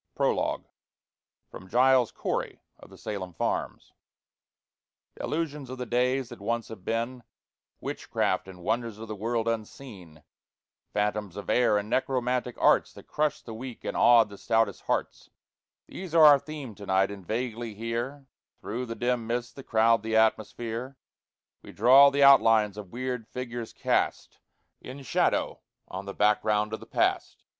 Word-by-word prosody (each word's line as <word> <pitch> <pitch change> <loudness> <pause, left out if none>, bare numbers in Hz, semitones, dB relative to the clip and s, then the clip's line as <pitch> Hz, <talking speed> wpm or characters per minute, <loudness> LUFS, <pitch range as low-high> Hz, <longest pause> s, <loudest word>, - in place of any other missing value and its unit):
PROLOGUE - - 0 0.9
From 95 - -11
"Giles 125 +1 +4
Corey - - -4 0.2
of - - -15
the - - -15
Salem 95 -4 -6
Farms" - - -3 1.2
Delusions 150 -4 -4
of 130 - -6
the 125 - -4
days 125 +1 0
that 120 -5 -11
once 115 +2 -2
have 110 -5 -10
been, 115 +4 -2 0.6
Witchcraft 95 - -2
and 90 -2 -12
wonders 115 +2 -2
of 115 +1 -8
the 110 - -5
world 115 +2 -2
unseen, 105 - -6 0.7
Phantoms 105 -2 -2
of 100 - -4
air, 120 -3 +3
and 105 0 -3
necromantic 125 0 -1
arts - - +3
That - - -13
crushed 150 -1 -1
the 115 - -7
weak 120 +1 -8
and - - -4
awed 115 -3 +6
the 100 - -12
stoutest 115 -3 +1
hearts, - - -2 0.6
These 180 -3 -8
are 160 -2 +8
our 145 -2 +8
theme 145 -4 -8
to 100 0 -11
night; 95 +1 +2
and 100 -2 -9
vaguely 115 +2 -4
here, 120 +6 -4 0.3
Through 125 +4 -5
the 115 - -5
dim 120 -2 -1
mists 120 +1 -3
that 135 - -11
crowd 115 0 +3
the 110 +1 -2
atmosphere, 115 +3 0 0.6
We - - -13
draw 130 +6 +7
the 140 0 +2
outlines 115 -7 +6
of 105 -3 -9
weird 125 -2 -4
figures 120 -2 -6
cast - - -1 0.4
In 135 +2 -9
shadow - - 0 0.3
on 95 +1 -7
the 100 - -7
background 105 0 +2
of - - -3
the - - -13
Past. - - -1
115 Hz, 155 wpm, -27 LUFS, 105-125 Hz, 1.2 s, are